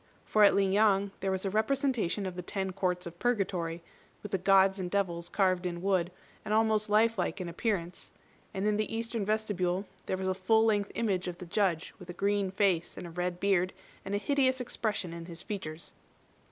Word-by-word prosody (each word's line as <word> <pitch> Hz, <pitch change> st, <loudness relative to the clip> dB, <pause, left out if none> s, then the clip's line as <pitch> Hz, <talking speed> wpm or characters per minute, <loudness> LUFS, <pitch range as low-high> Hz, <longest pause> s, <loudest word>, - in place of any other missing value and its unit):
For 215 Hz, -, +4 dB
at 200 Hz, -, +7 dB
Ling 195 Hz, -1 st, +3 dB
yang 200 Hz, -1 st, +3 dB
there 195 Hz, -, -1 dB
was 190 Hz, +1 st, -1 dB
a 195 Hz, -, -1 dB
representation 220 Hz, -3 st, 0 dB
of 185 Hz, -1 st, -4 dB
the 180 Hz, -, -4 dB
Ten 190 Hz, +1 st, -3 dB
Courts 180 Hz, -1 st, -1 dB
of 170 Hz, 0 st, -9 dB
Purgatory, 185 Hz, -8 st, -1 dB, 0.4 s
with 210 Hz, -, -7 dB
the 195 Hz, -, 0 dB
Gods 195 Hz, +1 st, +4 dB
and 180 Hz, -1 st, -3 dB
devils 175 Hz, -3 st, -1 dB
carved 185 Hz, -2 st, +1 dB
in 170 Hz, -1 st, -4 dB
wood, 185 Hz, -3 st, +1 dB, 0.3 s
and 215 Hz, -, 0 dB
almost 220 Hz, -1 st, +2 dB
life 220 Hz, +1 st, +3 dB
like 175 Hz, +1 st, -1 dB
in 180 Hz, -, -4 dB
appearance; 175 Hz, -1 st, -3 dB, 0.4 s
and 190 Hz, +1 st, -3 dB
in 210 Hz, 0 st, +2 dB
the 215 Hz, -, -1 dB
eastern 230 Hz, -1 st, -2 dB
vestibule 195 Hz, -3 st, 0 dB, 0.2 s
there 190 Hz, -, -1 dB
was 190 Hz, 0 st, -3 dB
a 190 Hz, -, +2 dB
full 220 Hz, +4 st, +3 dB
length 205 Hz, -2 st, +1 dB
image 200 Hz, -6 st, 0 dB
of 175 Hz, -1 st, -4 dB
the 180 Hz, -, -8 dB
Judge 175 Hz, -2 st, 0 dB
with 180 Hz, -2 st, -12 dB
a -, -, -4 dB
green 200 Hz, +1 st, 0 dB
face, 185 Hz, -3 st, +1 dB
and -, -, -6 dB
a 170 Hz, -, -8 dB
red 180 Hz, +1 st, -2 dB
beard, 185 Hz, -2 st, +2 dB, 0.3 s
and 195 Hz, +1 st, -3 dB
a -, -, +2 dB
hideous 260 Hz, +2 st, +2 dB
expression 215 Hz, -7 st, -2 dB
in 170 Hz, 0 st, -8 dB
his 170 Hz, +1 st, -8 dB
features. 170 Hz, -6 st, -6 dB
195 Hz, 205 wpm, -30 LUFS, 180-210 Hz, 0.4 s, at